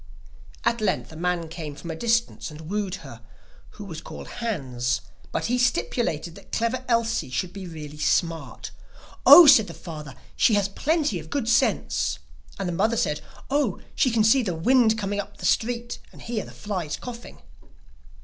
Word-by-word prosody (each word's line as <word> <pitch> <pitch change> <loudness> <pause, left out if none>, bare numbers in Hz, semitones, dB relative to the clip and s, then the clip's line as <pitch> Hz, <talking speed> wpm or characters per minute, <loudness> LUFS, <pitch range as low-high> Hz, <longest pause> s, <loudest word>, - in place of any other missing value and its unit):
At 235 -1 +1
length 195 -5 -1
a - - -11
man 175 0 -1
came 155 -3 -7
from 170 +3 -7
a - - -4
distance 230 +3 0
and 150 0 -10
wooed 195 +3 -2
her, 120 -4 -10 0.6
who 205 - -7
was 165 -4 -7
called - - -9
Hans; 125 - -1 0.3
but - - -2
he 245 +1 +1
stipulated 230 -9 0
that 200 - -15
Clever 235 +3 -1
Elsie 230 - +1
should 175 +7 -2
be 195 -2 -7
really 150 -3 -9
smart. 165 +1 -1 0.6
'Oh,' 350 - +12
said 265 -8 +7
the 165 - -9
father, 155 -4 -8 0.2
'she 220 - +4
has 200 -1 +2
plenty 300 +8 0
of - - -11
good 280 -5 -2
sense'; 240 - +1 0.4
and 195 - -3
the 175 - -2
mother 220 +6 +1
said: 150 -6 0 0.3
'Oh, 275 -9 +1
she 255 - +2
can 225 -2 +2
see 225 +5 +5
the 185 -8 -2
wind 225 +5 +4
coming 205 -1 -2
up 205 0 -6
the - - -7
street, 240 +1 0
and - - -15
hear 230 -3 -3
the - - -11
flies 185 -7 -4
coughing. 240 -1 -9
200 Hz, 180 wpm, -25 LUFS, 165-235 Hz, 0.6 s, Oh